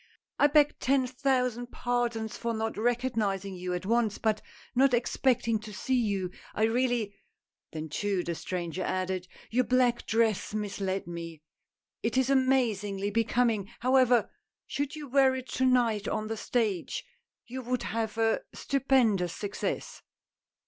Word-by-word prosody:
I 290 - +7
beg 295 0 +4
ten 265 0 +2
thousand 250 -2 0
pardons 240 -3 -1
for 235 -1 -2
not 220 0 -2
recognizing 220 -5 0
you 180 0 -3
at 180 - -5
once, 225 -1 +1
but 215 -1 0 0.3
not 260 0 +4
expecting 240 -2 +1
to 215 0 -9
see 210 +6 -3
you, 200 -7 +1 0.2
I 215 - +1
really 235 -2 +1 0.6
Then 155 0 -5
too," 190 +4 -1
the 170 - -2
stranger 175 +1 -4
added, 185 -1 -2
" - - -21
your 250 +3 +3
black 250 -1 +2
dress 220 -2 +1
misled 195 -2 -2
me 165 -2 -7 0.3
— - - -64
it 230 +2 -1
is 260 +1 +3
amazingly 215 -7 +1
becoming, 225 -2 +1
however; 250 -1 +4 0.3
should 285 +2 -3
you 300 -2 -7
wear 265 0 +4
it 260 0 -5
to 260 - 0
night 235 -5 +2
on 215 0 -2
the 225 - -1
stage, 215 -5 -1 0.4
you 260 +2 -6
would 250 0 -2
have 225 -1 -2
a 225 0 +2
stupendous 240 -10 +2
success." 205 -1 -4
230 Hz, 150 wpm, -29 LUFS, 200-255 Hz, 0.6 s, I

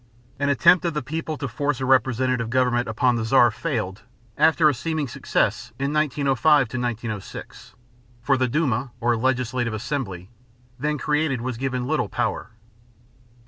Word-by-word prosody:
An 140 0 +1
attempt 140 +7 +5
of 170 -3 -1
the 150 - -2
people 160 +3 -4
to 140 - -3
force 140 +3 -2
a 130 - -2
representative 125 -2 +2
government 125 -1 +1
upon 120 +3 +1
the 115 - -2
Czar 120 +1 +5
failed 95 -2 -3 0.3
after 160 -1 +4
a 150 - +4
seeming 155 +3 -2
success - - -1
in 140 +2 -2
1905 150 0 +3
1906; 115 -4 -5 0.5
for 135 +2 +3
the 130 -1 +1
Duma, 130 -2 0
or 120 0 +2
legislative 125 -1 -1
assembly, 110 - -4 0.5
then 150 +3 -1
created 150 -3 0
was 125 -1 -4
given 130 -1 -2
little - - -1
power. - - -2
130 Hz, 145 wpm, -23 LUFS, 120-145 Hz, 0.5 s, attempt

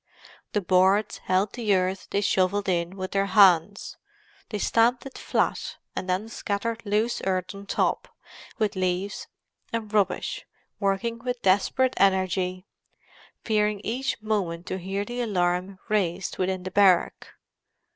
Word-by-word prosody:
The 210 - +1
boards 190 +3 +3
held 190 +2 0
the 220 -5 +1
earth 185 +1 -1
they 200 - 0
shovelled 195 +1 +1
in 175 0 0
with 185 0 -4
their 195 0 +1
hands; 200 -2 +4 0.5
they 210 - -3
stamped 235 +5 +2
it 270 - -9
flat, - - -1 0.2
and 185 - -4
then 185 +4 0
scattered 225 +1 -3
loose 215 +4 0
earth 185 -1 -1
on 200 0 -11
top, - - 0 0.5
with 210 -2 0
leaves 185 +1 -2 0.4
and 225 -2 -4
rubbish, 205 -2 0 0.3
working 215 +4 -1
with 245 0 -4
desperate 205 +7 +2
energy—fearing 190 +3 -1
each 255 +4 -2
moment 185 -6 -2
to 185 - -4
hear 195 +3 -3
the 240 +2 -4
alarm 185 -3 0
raised 190 -4 -1
within 185 0 -1
the 185 - -5
barrack. 190 -3 +3
195 Hz, 135 wpm, -26 LUFS, 185-215 Hz, 0.5 s, hands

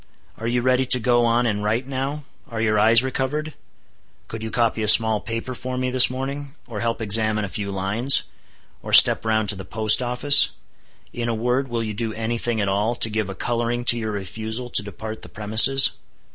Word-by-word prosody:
"Are 115 - -6
you 120 0 -2
ready 130 0 0
to 125 - +3
go 120 0 0
on 120 +1 0
and 105 -3 -3
write 115 +5 -2
now? 135 +2 -6 0.3
Are 115 - -7
your 110 -1 0
eyes 115 +3 +4
recovered? 140 +4 -4 0.7
Could 115 - -9
you 110 - -6
copy 115 -1 -2
a 105 - -3
small 110 0 +6
paper 115 +2 -6
for 125 +1 -7
me 130 0 -3
this 125 -1 +6
morning? 135 +2 -7
or 115 -4 -8
help 115 0 -4
examine 110 0 +1
a - - -7
few 100 +1 -6
lines? 100 +7 +1 0.6
or - - -9
step - - +7
round 110 -1 -1
to 105 - +1
the 95 - -9
post 110 +5 +2
office? 125 +4 +4 0.6
In 120 -1 -5
a 115 - -2
word, 125 +4 -2
will 120 -2 -4
you 110 -1 -6
do 110 +1 -5
any 115 +1 -4
thing 120 -2 -3
at 100 - -2
all, 105 +5 -2
to 115 -2 +3
give 110 -2 -3
a 95 - -8
coloring 120 +1 -4
to 120 - +1
your 110 -1 -5
refusal 110 +5 -6
to - - +4
depart 110 +2 -10
the - - -9
premises?" 110 +6 +4
115 Hz, 210 wpm, -20 LUFS, 110-125 Hz, 0.7 s, step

